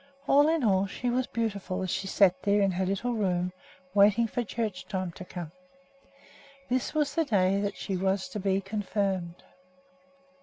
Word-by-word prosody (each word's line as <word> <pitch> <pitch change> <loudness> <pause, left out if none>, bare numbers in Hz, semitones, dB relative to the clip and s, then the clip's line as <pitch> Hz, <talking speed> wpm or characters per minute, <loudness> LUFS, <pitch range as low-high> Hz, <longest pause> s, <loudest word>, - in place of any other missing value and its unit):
All 290 +2 +6
in 320 -3 +1
all, 195 -3 +3
she 245 +5 -2
was 255 +1 0
beautiful, 200 -5 -2
as 185 - -2
she 195 - -2
sat 190 -2 +3
there 205 0 +2
in 195 -1 +3
her 185 +1 -1
little 215 +6 -1
room 180 -4 0 0.4
waiting 205 +3 +5
for 240 +2 -2
church 220 -3 -4
time 185 -3 -3
to 185 - -9
come. 175 -3 -7 1.2
This 255 +4 -1
was 295 -2 +1
the 330 - +2
day 195 -7 +2
that 200 0 -2
she 195 - -3
was 190 +1 0
to 210 - -5
be 195 0 +1
confirmed. 195 -3 -2
200 Hz, 175 wpm, -28 LUFS, 185-230 Hz, 1.2 s, All